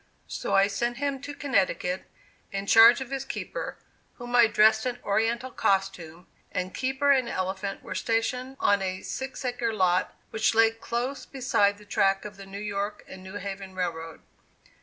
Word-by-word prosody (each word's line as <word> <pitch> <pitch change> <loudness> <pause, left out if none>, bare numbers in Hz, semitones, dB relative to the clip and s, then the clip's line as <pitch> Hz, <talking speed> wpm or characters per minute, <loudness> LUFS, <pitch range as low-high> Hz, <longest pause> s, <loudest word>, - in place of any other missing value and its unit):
So - - -2
I 195 - +6
sent 235 +4 -2
him 280 -1 -2
to 285 0 -7
Connecticut 185 -9 0 0.5
in 195 0 -3
charge 230 +5 +7
of 265 0 -6
his 270 -1 -2
keeper, - - -5 0.4
whom 240 0 -5
I 240 -2 +7
dressed 220 0 +4
in 245 -1 -3
Oriental 230 +5 0
costume, 180 -5 -1 0.3
and 185 0 -3
keeper 265 +2 +1
and 260 -3 +3
elephant 190 +1 -3
were - - -6
stationed 250 +3 -1
on 200 -1 +3
a 185 0 -3
six 265 0 -5
acre 245 -2 -1
lot 185 -4 +1 0.2
which 220 0 +1
lay 225 0 +6
close 240 +4 -4
beside 225 -7 +1
the 210 - -16
track 195 -1 +1
of 210 0 -7
the 195 0 -11
New 195 +1 -8
York 205 0 -3
and 190 - -10
New 190 +2 -10
Haven 195 -1 -6
Railroad. 165 -3 -4
210 Hz, 170 wpm, -27 LUFS, 195-245 Hz, 0.5 s, charge